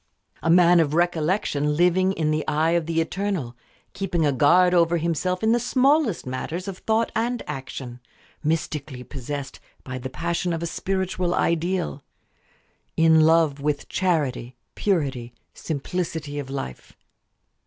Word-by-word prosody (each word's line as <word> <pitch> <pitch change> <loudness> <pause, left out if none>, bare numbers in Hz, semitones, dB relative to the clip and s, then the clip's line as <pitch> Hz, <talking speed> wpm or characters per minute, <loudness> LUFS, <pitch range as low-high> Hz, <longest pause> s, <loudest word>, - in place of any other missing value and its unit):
A - - -1
man 175 0 +6
of 155 -2 +1
"recollection" 160 -3 +1
living 180 +2 +3
in 155 -4 0
the 155 0 0
eye 155 +2 +2
of 170 -2 +1
the 165 -1 0
Eternal; 170 -8 -3 0.4
keeping 180 -5 -1
a 145 - +3
guard 175 +7 +4
over 170 -1 +3
himself 170 +4 -1
in 220 - +3
the 240 - +3
smallest 260 - +2
matters 160 +8 -4
of 190 -2 -6
thought 225 +1 0
and 235 +2 -1
action; 130 -3 -7 0.4
mystically 150 -4 -2
possessed 135 +1 -6 0.2
by 130 0 -6
the 130 +1 -5
passion 170 +4 -2
of 165 0 -3
a - - 0
spiritual 185 0 -1
ideal; 170 -2 0 1.0
in 160 0 +5
love 160 -2 +4
with 145 0 -2
charity, 145 -9 -1 0.2
purity, 135 - -1 0.2
simplicity 160 -1 -4
of 135 -2 -6
life. 135 - -6
165 Hz, 140 wpm, -24 LUFS, 145-180 Hz, 1.0 s, man